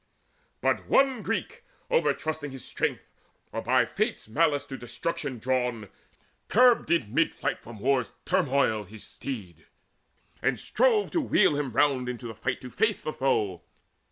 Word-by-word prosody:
But - - +1
one 270 -4 +3
Greek, 470 - -3 0.3
over 485 0 +4
trusting 155 -1 -3
in 135 - -9
his 135 - -8
strength, - - -2 0.5
Or - - -3
by - - +3
Fate's - - -2
malice 145 +3 +2
to 135 - -7
destruction 125 +3 -4
drawn, 125 -3 -1 0.6
Curbed 245 -5 +5
in 145 -11 +1
mid 165 +3 +2
flight - - -2
from 115 -2 -11
war's 130 +1 +1
turmoil 140 - +2
his 105 +3 -10
steed, 95 - -7 0.7
And - - +1
strove 455 -4 +2
to 335 - +1
wheel 205 - +3
him 145 -3 -2
round 130 -1 +2
into 125 0 -6
the 115 - -5
fight 125 +3 -3
To 125 - -9
face 220 -2 +1
the 155 - -4
foe. 105 -9 0
135 Hz, 155 wpm, -27 LUFS, 120-165 Hz, 0.7 s, Curbed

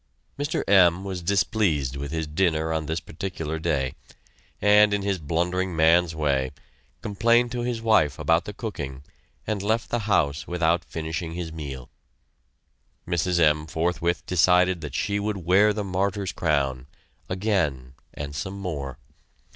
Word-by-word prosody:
Mr. 145 +1 -2
M. 95 -2 +5
was 95 -2 -4
displeased 85 - +1
with 70 0 -5
his 80 -1 -2
dinner 80 0 0
on 80 -1 -2
this 80 +1 -1
particular 80 -2 -5
day, 70 -6 -1 0.7
and, 105 0 +5
in 100 - -3
his 100 -2 -1
blundering 85 +4 -1
man's 80 +1 +4
way, 70 -4 0 0.5
complained 115 +4 +2
to 125 - -3
his 120 -1 -2
wife 75 -12 +3
about 85 +1 +2
the - - -5
cooking 75 - -6 0.4
and 105 -3 -2
left 110 +3 -1
the 120 - +1
house 75 -5 +1
without 85 -1 +1
finishing 80 +1 -5
his 85 -2 -5
meal. 70 -5 -7 1.2
Mrs. 85 0 +1
M. 75 -1 +3
forthwith 85 +2 -1
decided 90 0 +3
that 75 -4 -6
she 100 0 0
would 105 0 -2
wear 95 +4 +4
the 105 0 -2
martyr's 95 0 -1
crown, 70 -5 -1 0.4
again 90 - -1 0.2
and 70 -1 -5
some 95 +5 -4
more! 70 -9 -5
85 Hz, 145 wpm, -25 LUFS, 75-100 Hz, 1.2 s, M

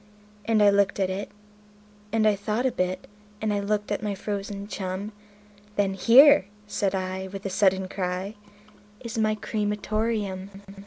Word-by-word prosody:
And 220 -2 +3
I 205 - +7
looked 200 0 +2
at 190 -1 +1
it, 195 +2 -4 0.8
and 220 -1 +3
I 210 - +4
thought 210 +5 -2
a 260 - +2
bit, 185 -5 -2 0.3
and 215 -1 0
I 205 - 0
looked 210 +1 -1
at 205 - -1
my 210 -2 -2
frozen 200 0 -5
chum; 195 +1 -4 0.6
Then 200 -1 +1
"Here", 240 +4 +7 0.2
said 200 -2 -1
I, 190 0 -3
with 195 +1 -8
a 195 - -2
sudden 190 -1 +2
cry, 185 +1 -3 0.7
"is 235 -2 -5
my 215 0 +2
cre 215 +1 -6
ma 210 0 +1
tor 215 +2 -1
eum." 195 -4 -3
205 Hz, 170 wpm, -26 LUFS, 190-215 Hz, 0.8 s, I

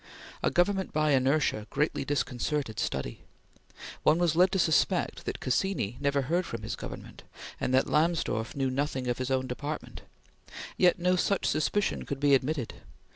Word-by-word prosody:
A - - +2
government 190 +2 +1
by 155 0 +2
inertia 135 -5 +2
greatly 150 -1 0
disconcerted 135 -3 -2
study. 65 -3 -3 0.8
One 155 - +4
was 170 -2 +2
led 180 +2 +5
to - - +2
suspect 160 -3 +1
that - - -4
Cassini 130 - -1
never 140 -1 +1
heard 170 +7 0
from 115 -10 -6
his 110 - -3
Government, - - -9 0.4
and - - -1
that 130 - +4
Lamsdorf 155 -8 0
knew 135 -2 0
nothing 135 -1 -2
of 120 0 -1
his 130 0 -2
own 130 -1 +1
department; 145 +4 -5 0.7
yet 180 -1 +4
no 180 +1 +2
such 195 +2 0
suspicion 200 +6 0
could 140 - -3
be 145 0 +4
admitted. 135 -1 +1
145 Hz, 160 wpm, -29 LUFS, 130-170 Hz, 0.8 s, led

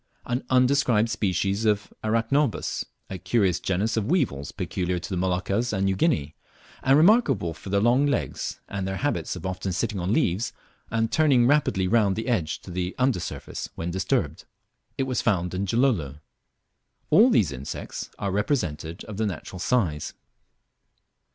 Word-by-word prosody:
An 125 +2 -2
undescribed 125 -4 +3
species 100 +1 0
of 105 -1 0
Arachnobas, 115 +4 0 0.2
a 95 - -6
curious 95 -4 +1
genus 100 +5 0
of 110 +1 -1
weevils 115 - 0
peculiar 90 0 -2
to 90 - -6
the - - -1
Moluccas 95 +6 0
and 95 -2 0
New 95 0 +1
Guinea, 90 - 0 0.5
and 135 +1 +4
remarkable 155 - +4
for 80 +4 -10
their 100 +1 +2
long 125 +6 +4
legs, 140 - -2
and 100 -1 -3
their 95 - -2
habit 145 -1 -1
of 90 0 -8
often 95 +1 -3
sitting 105 +2 -1
on 90 +2 -1
leaves, 105 +1 +1 0.4
and 115 0 0
turning 140 -6 +4
rapidly 130 -9 +2
round 100 -2 +3
the 110 - -4
edge 85 -11 -1
to 95 - -10
the 90 +1 -3
under 130 -6 +2
surface 85 - -6
when 85 +1 -3
disturbed. 95 +1 -1 0.5
It - - +1
was 130 -1 -1
found 90 -3 0
in 95 +2 -1
Gilolo. 95 - +1 0.9
All 230 +5 +7
these 100 - +3
insects 70 +1 -6
are 100 - -2
represented 90 - -2
of 105 -2 -8
the 110 0 +1
natural 90 0 -6
size. 90 - 0
100 Hz, 160 wpm, -25 LUFS, 90-125 Hz, 0.9 s, All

